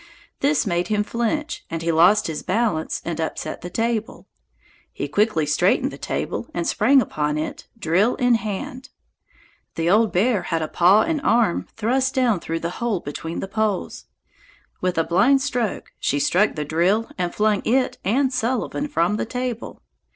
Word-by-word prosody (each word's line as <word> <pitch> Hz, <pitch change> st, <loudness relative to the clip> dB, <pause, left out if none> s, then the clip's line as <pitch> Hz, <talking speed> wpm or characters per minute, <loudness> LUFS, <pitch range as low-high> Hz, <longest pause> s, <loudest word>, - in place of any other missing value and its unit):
This 285 Hz, -2 st, +2 dB
made 175 Hz, -2 st, 0 dB
him 210 Hz, -1 st, +1 dB
flinch 240 Hz, +9 st, -2 dB
and 165 Hz, 0 st, -4 dB
he 165 Hz, -, +1 dB
lost 180 Hz, +7 st, +5 dB
his 160 Hz, -2 st, -3 dB
balance 200 Hz, -6 st, -1 dB
and 165 Hz, -1 st, -3 dB
upset 160 Hz, -, -4 dB
the 175 Hz, -, -6 dB
table. 225 Hz, +2 st, -2 dB, 0.7 s
He 145 Hz, -, -4 dB
quickly 200 Hz, 0 st, +1 dB
straightened 150 Hz, -, +2 dB
the -, -, -9 dB
table -, -, -3 dB
and 170 Hz, -1 st, -1 dB
sprang 260 Hz, +9 st, +4 dB
upon 150 Hz, -5 st, -2 dB
it, 155 Hz, -, -5 dB
drill 200 Hz, +4 st, +2 dB
in 245 Hz, -1 st, +2 dB
hand. 230 Hz, +4 st, -3 dB, 0.9 s
The 165 Hz, +1 st, +1 dB
old 220 Hz, +1 st, +4 dB
bear 210 Hz, +3 st, +2 dB
had 165 Hz, -2 st, -2 dB
a -, -, -2 dB
paw 185 Hz, +7 st, +4 dB
and 320 Hz, -3 st, -1 dB
arm 230 Hz, -8 st, +2 dB
thrust 260 Hz, +4 st, 0 dB
down 245 Hz, -7 st, +2 dB
through 165 Hz, 0 st, -4 dB
the 170 Hz, -, -2 dB
hole 230 Hz, -6 st, 0 dB
between 165 Hz, +2 st, -5 dB
the -, -, -4 dB
poles. 210 Hz, -1 st, -2 dB, 0.8 s
With 180 Hz, -1 st, -1 dB
a 165 Hz, -, +3 dB
blind 195 Hz, +12 st, +3 dB
stroke 245 Hz, -7 st, -2 dB
she 145 Hz, -, 0 dB
struck 180 Hz, +8 st, +2 dB
the 150 Hz, -1 st, -3 dB
drill 180 Hz, +9 st, +1 dB
and 175 Hz, -1 st, 0 dB
flung 210 Hz, -1 st, +1 dB
it 255 Hz, +2 st, +1 dB
and 260 Hz, +6 st, +1 dB
Sullivan 250 Hz, +4 st, -1 dB
from 180 Hz, -, +1 dB
the -, -, -2 dB
table. 250 Hz, -1 st, -5 dB
210 Hz, 170 wpm, -22 LUFS, 170-235 Hz, 0.9 s, lost